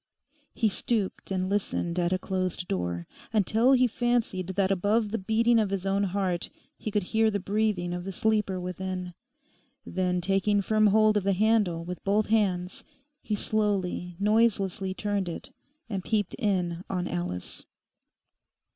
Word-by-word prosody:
He 225 Hz, -, +2 dB
stooped 215 Hz, -1 st, -2 dB
and 185 Hz, -1 st, -1 dB
listened 185 Hz, -3 st, -1 dB
at 175 Hz, 0 st, +1 dB
a 185 Hz, -, +2 dB
closed 185 Hz, -1 st, -2 dB
door, 90 Hz, -2 st, -2 dB, 0.3 s
until 225 Hz, +4 st, +3 dB
he 255 Hz, -1 st, +5 dB
fancied 240 Hz, -6 st, 0 dB
that 195 Hz, -1 st, +2 dB
above 205 Hz, +3 st, +1 dB
the 225 Hz, -, -1 dB
beating 230 Hz, +4 st, +3 dB
of 210 Hz, -3 st, +1 dB
his 195 Hz, -1 st, -2 dB
own 195 Hz, +1 st, +1 dB
heart 185 Hz, -2 st, -1 dB, 0.3 s
he -, -, -5 dB
could 210 Hz, -1 st, 0 dB
hear 220 Hz, 0 st, +4 dB
the 205 Hz, -1 st, -1 dB
breathing 195 Hz, -3 st, 0 dB
of 175 Hz, 0 st, -4 dB
the 195 Hz, -, -4 dB
sleeper 210 Hz, -1 st, +1 dB
within. 180 Hz, 0 st, -4 dB, 0.7 s
Then, 180 Hz, 0 st, 0 dB
taking 195 Hz, +3 st, +2 dB
firm 215 Hz, +1 st, +3 dB
hold 215 Hz, +1 st, +4 dB
of 205 Hz, -, 0 dB
the 195 Hz, 0 st, +2 dB
handle 200 Hz, -5 st, +2 dB
with 180 Hz, 0 st, -6 dB
both 205 Hz, +2 st, +1 dB
hands, 190 Hz, -5 st, +1 dB, 0.4 s
he 215 Hz, -, -2 dB
slowly 200 Hz, -5 st, -1 dB
noiselessly 200 Hz, -3 st, +2 dB
turned 200 Hz, -3 st, -1 dB
it, 170 Hz, -, -7 dB, 0.4 s
and 195 Hz, -5 st, -3 dB
peeped 210 Hz, -2 st, 0 dB
in 180 Hz, -4 st, 0 dB
on 180 Hz, -2 st, -1 dB
Alice. 90 Hz, +1 st, -4 dB
195 Hz, 155 wpm, -28 LUFS, 180-215 Hz, 0.7 s, he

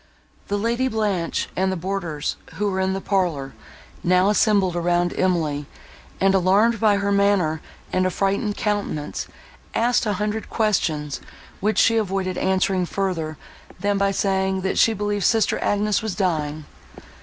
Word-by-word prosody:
The 205 Hz, -, -1 dB
Lady 235 Hz, +5 st, 0 dB
Blanche, 205 Hz, -8 st, -1 dB
and 190 Hz, +1 st, +1 dB
the -, -, -1 dB
boarders, 175 Hz, -4 st, -3 dB, 0.2 s
who 205 Hz, 0 st, 0 dB
were 190 Hz, -, -2 dB
in 190 Hz, 0 st, +1 dB
the 195 Hz, -, -2 dB
parlour, 170 Hz, -10 st, -1 dB, 0.5 s
now 185 Hz, +2 st, +4 dB
assembled 205 Hz, -4 st, +3 dB
round 175 Hz, 0 st, +1 dB
Emily, 155 Hz, -6 st, 0 dB, 0.5 s
and, 195 Hz, 0 st, +3 dB
alarmed 200 Hz, +5 st, +3 dB
by 210 Hz, -2 st, +4 dB
her 200 Hz, 0 st, 0 dB
manner 200 Hz, -6 st, +2 dB, 0.3 s
and 185 Hz, -, +2 dB
affrighted 195 Hz, +3 st, -1 dB
countenance, 205 Hz, -8 st, -2 dB, 0.5 s
asked 240 Hz, 0 st, +2 dB
a 210 Hz, -, +1 dB
hundred 210 Hz, +2 st, -3 dB
questions, 160 Hz, -, 0 dB, 0.4 s
which 215 Hz, +2 st, 0 dB
she 225 Hz, 0 st, +4 dB
avoided 190 Hz, -3 st, -1 dB
answering 190 Hz, -1 st, +1 dB
further, 165 Hz, -6 st, -2 dB, 0.4 s
than 200 Hz, +1 st, 0 dB
by 200 Hz, 0 st, +3 dB
saying, 190 Hz, -1 st, 0 dB
that 190 Hz, -, -1 dB
she 225 Hz, -, +5 dB
believed 205 Hz, -1 st, -2 dB
sister 225 Hz, -2 st, +2 dB
Agnes 205 Hz, 0 st, +1 dB
was 220 Hz, -4 st, -3 dB
dying. 155 Hz, -5 st, -1 dB
195 Hz, 145 wpm, -22 LUFS, 175-205 Hz, 0.5 s, she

